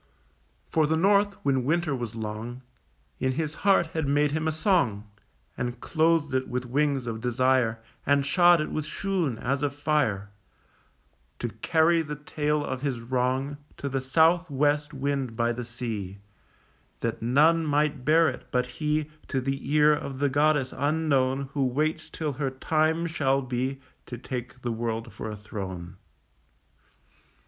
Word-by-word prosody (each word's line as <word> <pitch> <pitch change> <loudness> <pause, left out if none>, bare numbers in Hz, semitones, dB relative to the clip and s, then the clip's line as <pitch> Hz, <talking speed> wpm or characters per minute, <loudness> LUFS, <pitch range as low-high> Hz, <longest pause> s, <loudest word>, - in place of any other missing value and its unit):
For 155 -2 +2
the 160 +1 +1
north, 200 +3 +3
when 135 -2 +2
winter 155 +1 +1
was 120 -3 -5
long, 115 +3 -5 0.6
In 130 0 +1
his 155 +1 -2
heart 195 -3 +4
had 160 -3 -1
made 145 +1 +2
him 155 +1 -1
a - - +2
song, 155 - +1 0.5
And 120 0 -3
clothed 160 -2 +1
it 130 0 0
with 125 0 -3
wings 140 +1 0
of 115 -1 -4
desire, 125 -1 +2 0.3
And 140 0 +2
shod 175 +3 +5
it 155 - -3
with 155 - -2
shoon 175 - -1
as 135 +4 -1
of 145 -1 -1
fire, 145 -10 0 1.1
To - - -3
carry 165 +1 +2
the 150 -1 -5
tale 150 0 -1
of 130 -1 -4
his 135 -4 -1
wrong 130 +4 -1 0.2
To 140 - -4
the 135 -1 -1
south 165 +6 +3
west 145 +1 +1
wind 135 -4 -2
by 120 +1 +1
the 120 +1 -5
sea, 115 -5 -5 0.8
That 115 -1 -2
none 150 +8 +4
might 150 -2 +1
bear 160 +4 +5
it - - -4
but 125 0 +1
he 150 +4 -1 0.2
To 135 - -1
the 135 +1 -3
ear 150 0 +6
of 140 -2 -4
the 145 +1 +1
goddess 145 -1 +2
unknown 140 -3 +1
Who 140 - +1
waits 155 +5 -1
till 155 -3 -3
her 135 0 -1
time 155 +5 +1
shall 140 -5 +1
be 130 +2 -2 0.3
To 120 - -6
take 125 0 -6
the 120 - -1
world 115 0 -3
for 110 - -6
a 105 - -5
throne. 95 -5 -7
140 Hz, 160 wpm, -27 LUFS, 125-155 Hz, 1.1 s, ear